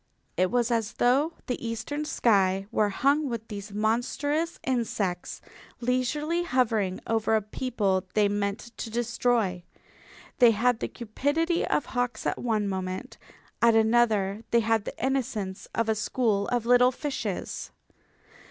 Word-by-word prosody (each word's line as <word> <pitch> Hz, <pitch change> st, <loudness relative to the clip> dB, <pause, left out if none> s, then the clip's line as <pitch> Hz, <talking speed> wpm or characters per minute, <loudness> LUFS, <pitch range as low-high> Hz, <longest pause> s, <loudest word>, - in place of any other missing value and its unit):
It 185 Hz, +1 st, +2 dB
was 240 Hz, +1 st, +1 dB
as 230 Hz, -1 st, 0 dB
though 275 Hz, +7 st, +2 dB
the 250 Hz, -, -3 dB
eastern 240 Hz, +6 st, -3 dB
sky 195 Hz, -8 st, +2 dB
were 215 Hz, -2 st, +2 dB
hung 280 Hz, +7 st, +2 dB
with 230 Hz, -2 st, -5 dB
these 205 Hz, -1 st, -7 dB
monstrous 255 Hz, +10 st, -1 dB
insects, 215 Hz, -8 st, -2 dB, 0.4 s
leisurely 255 Hz, +7 st, 0 dB
hovering 225 Hz, -, +1 dB
over 225 Hz, -1 st, +1 dB
a 220 Hz, -, +2 dB
people 205 Hz, -5 st, -1 dB
they 210 Hz, -1 st, +4 dB
meant 205 Hz, +3 st, -3 dB
to 230 Hz, -, -5 dB
destroy. 235 Hz, -5 st, 0 dB, 0.8 s
They 245 Hz, -3 st, +8 dB
had 245 Hz, +1 st, +2 dB
the -, -, -2 dB
cupidity 290 Hz, +9 st, -1 dB
of -, -, +1 dB
hawks 245 Hz, -1 st, -2 dB
at -, -, -1 dB
one 215 Hz, -4 st, 0 dB
moment. 190 Hz, +5 st, -4 dB, 0.4 s
At 235 Hz, -1 st, +5 dB
another 220 Hz, -2 st, +2 dB
they 235 Hz, -, +4 dB
had 225 Hz, -1 st, +1 dB
the -, -, -6 dB
innocence 225 Hz, -8 st, -2 dB
of 230 Hz, 0 st, +1 dB
a 220 Hz, -, +3 dB
school 215 Hz, -2 st, 0 dB
of 240 Hz, -2 st, -1 dB
little 245 Hz, +1 st, +5 dB
fishes. 285 Hz, +2 st, -4 dB
230 Hz, 140 wpm, -27 LUFS, 210-250 Hz, 0.8 s, They